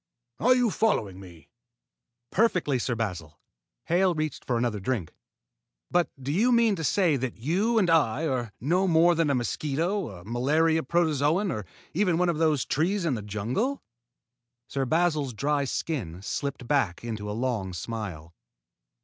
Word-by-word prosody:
Are 255 +2 +5
you 245 -3 +2
following 105 - 0
me?" 90 -4 -14 0.8
"Perfectly, 180 - +2
Sir 120 0 -1
Basil." 90 -9 -4 0.4
Hale 180 +1 +2
reached 155 -1 -3
for 120 - -1
another 115 -3 -1
drink. 100 -5 -2 0.8
"But 175 -1 +2
do 135 +2 -3
you 220 +10 +3
mean 230 -3 +4
to 160 - -4
say 170 -2 +2
that 130 -2 -4
you 190 - +1
and 200 -5 +4
I 160 -3 +2
are 125 -7 -1
no 180 +9 +1
more 170 0 +5
than 165 -2 +1
a 140 - +2
mosquito, 155 - -1
a 90 -3 -11
malaria 155 +8 +2
protozoan, 160 +4 +1
or 105 - -5 0.3
even 180 -1 +2
one 180 0 +2
of 160 -2 -1
those 155 -5 +2
trees 175 +5 0
in 155 - +1
the 110 - -3
jungle?" 115 - -2 0.8
Sir 135 -1 -2
Basil's 155 -4 +1
dry 145 +3 0
skin 105 - -3
slipped 135 +3 -4
back 120 -12 0
into 110 -3 -4
a 105 - -3
long 115 -7 -1
smile. 90 -4 -6
145 Hz, 160 wpm, -27 LUFS, 115-175 Hz, 0.8 s, Are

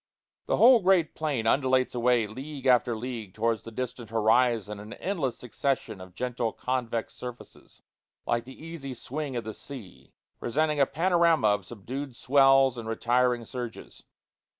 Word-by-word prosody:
The - - +1
whole 245 0 +8
great 185 -5 +3
plain 145 -8 -2
undulates 130 +1 +2
away 120 -1 +2
league 135 +6 -8
after 125 -2 +4
league 110 -4 -6
towards 115 0 0
the - - -9
distant 125 0 -5
horizon 110 -1 +2
in 105 +2 -9
an - - -13
endless 160 - -2
succession 125 -4 -2
of 95 -1 -12
gentle 120 0 -2
convex 120 -3 -2
surfaces 125 -1 -11 0.4
like 120 0 0
the 130 +5 -11
easy 145 -6 -6
swing 140 +3 -4
of 120 - -2
the 110 0 -6
sea 120 -6 -11 0.3
presenting 150 +4 0
a 140 - +4
panorama 170 - +3
of 105 -2 0
subdued 125 +4 -6
swells 135 -1 +4
and 110 -1 -6
retiring 120 +1 +1
surges. 120 -1 -7
125 Hz, 150 wpm, -27 LUFS, 115-140 Hz, 0.4 s, whole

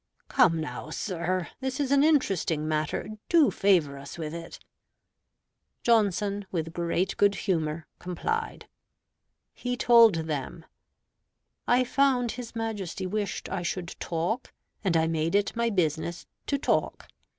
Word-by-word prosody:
"Come 165 -2 +4
now, 155 0 -5
sir, 180 +1 -2
this 265 +1 -3
is 280 -2 0
an 280 0 +5
interesting 195 - +2
matter; 155 -1 -1 0.2
do 330 -5 +5
favor 165 -8 +2
us 140 +4 -9
with 155 -2 -4
it." 165 0 -7 1.3
Johnson, 205 -3 +2
with 165 -2 -3
great 175 +2 -1
good 200 -1 +4
humor, 160 -4 -1
complied. 445 - -3 0.9
He 245 0 -3
told 230 -5 +7
them: 155 +1 -4 1.0
"I 250 +1 +4
found 255 -2 +2
his 240 -1 -8
Majesty 210 -5 -3
wished 205 +1 -3
I 190 -1 -2
should 175 0 -4
talk, 175 +7 -2 0.3
and 180 -5 +2
I 160 - +3
made 165 +2 0
it 205 +2 +1
my 235 0 +1
business 170 -3 -1 0.2
to 280 - +1
talk. - - -1
185 Hz, 130 wpm, -27 LUFS, 165-235 Hz, 1.3 s, told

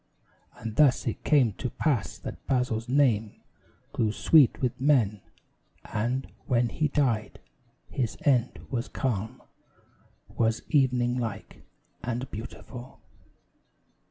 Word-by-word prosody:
And 110 -1 -6
thus 145 -4 +4
it - - -3
came 130 -8 +4
to 125 - -2
pass 125 - -1
that - - -9
Basil's 125 -3 0
name 120 -6 +2 0.5
Grew 110 -2 +1
sweet 145 +2 +5
with 125 0 -2
men; 120 -8 +3 0.6
and, 125 +5 -1 0.2
when 120 -1 +2
he 155 +4 0
died, 130 -7 0 0.5
his 125 -4 -2
end 130 -4 +2
Was 120 -3 -2
calm 115 -1 -3 0.8
was 110 0 0
evening 125 -3 +2
like, 110 -5 -5 0.4
and 125 +2 -3
beautiful. 120 +3 -9
125 Hz, 110 wpm, -27 LUFS, 115-135 Hz, 0.8 s, sweet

